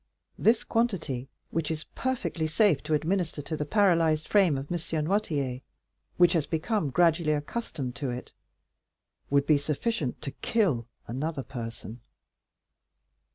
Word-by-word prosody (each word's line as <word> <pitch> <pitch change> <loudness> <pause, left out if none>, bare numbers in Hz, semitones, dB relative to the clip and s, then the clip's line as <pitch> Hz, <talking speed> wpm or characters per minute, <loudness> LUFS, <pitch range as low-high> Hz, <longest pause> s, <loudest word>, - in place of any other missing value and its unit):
This 225 +1 +4
quantity, 160 - -1 0.2
which 165 -1 -1
is 155 -1 -3
perfectly 245 -11 -1
safe 155 -2 +3
to 155 - +2
administer 160 -1 -1
to 155 - -3
the 150 - -2
paralyzed 165 -6 +3
frame 190 -9 +4
of 135 +4 -6
M. - - +1 0.3
Noirtier, 150 -9 0 0.6
which 175 0 +6
has 160 -4 +1
become 165 +1 0
gradually 165 +1 +3
accustomed 145 - -3
to 135 +1 -2
it, 125 +1 -6 1.0
would 140 0 +3
be 150 -1 +4
sufficient 150 - -2
to 140 - -3
kill 145 - 0 0.2
another 140 +3 -3
person." 115 -2 -7
155 Hz, 130 wpm, -28 LUFS, 140-180 Hz, 1.0 s, which